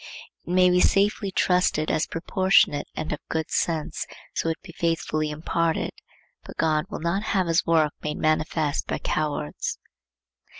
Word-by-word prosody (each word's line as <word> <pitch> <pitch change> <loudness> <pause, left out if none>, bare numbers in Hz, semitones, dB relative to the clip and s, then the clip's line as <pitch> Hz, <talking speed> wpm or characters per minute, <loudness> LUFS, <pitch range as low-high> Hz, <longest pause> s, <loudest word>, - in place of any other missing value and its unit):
It - - -3
may 180 0 +5
be 180 - +4
safely 200 +2 +3
trusted 180 -4 +2
as 155 - +1
proportionate 165 -3 +2
and 155 0 -3
of 150 - -4
good 160 -1 -1
issues, 160 -2 -1 0.3
so 165 - -1
it 165 - -2
be 185 - -10
faithfully 165 -2 -1
imparted, 160 +2 -1 0.5
but - - -11
God 155 -1 +2
will 205 - -6
not 170 +4 0 0.2
have 185 - +2
his 165 0 +1
work 160 -2 +3
made 150 - -3
manifest 155 -1 0
by - - -1
cowards. 145 - -2
165 Hz, 155 wpm, -25 LUFS, 155-180 Hz, 0.5 s, may